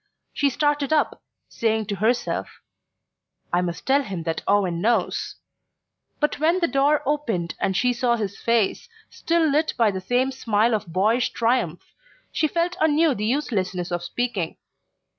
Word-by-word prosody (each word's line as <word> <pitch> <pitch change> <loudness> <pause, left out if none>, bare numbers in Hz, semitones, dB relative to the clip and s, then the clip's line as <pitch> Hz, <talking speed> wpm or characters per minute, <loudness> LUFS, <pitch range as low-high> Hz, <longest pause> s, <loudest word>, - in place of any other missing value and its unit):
She 285 - +2
started 290 +1 0
up, 310 -1 +1 0.3
saying 220 -1 -1
to 200 -1 -4
herself: 235 +4 -1 0.9
"I 175 - +3
must 175 -2 -4
tell 275 +2 +3
him 190 -10 -5
that 165 0 -2
Owen 190 -4 +2
knows..." 230 +4 0 0.8
but 300 -1 0
when 330 +4 +3
the 340 - +2
door 285 +1 +2
opened 230 - -1
and 190 -1 0
she 250 -1 +2
saw 240 0 +1
his 205 -4 -3
face, 230 - 0 0.2
still 335 -1 +1
lit 305 +2 +1
by 225 -3 +4
the 190 -1 -5
same 250 +7 +1
smile 225 -2 +1
of 210 -4 -1
boyish 215 +8 +2
triumph, 230 -8 -1 0.4
she 310 - +1
felt 340 +3 -1
anew 315 0 +4
the 210 -3 -3
uselessness 190 -9 -1
of 175 0 -1
speaking... 200 -4 -3
235 Hz, 155 wpm, -23 LUFS, 195-290 Hz, 0.9 s, by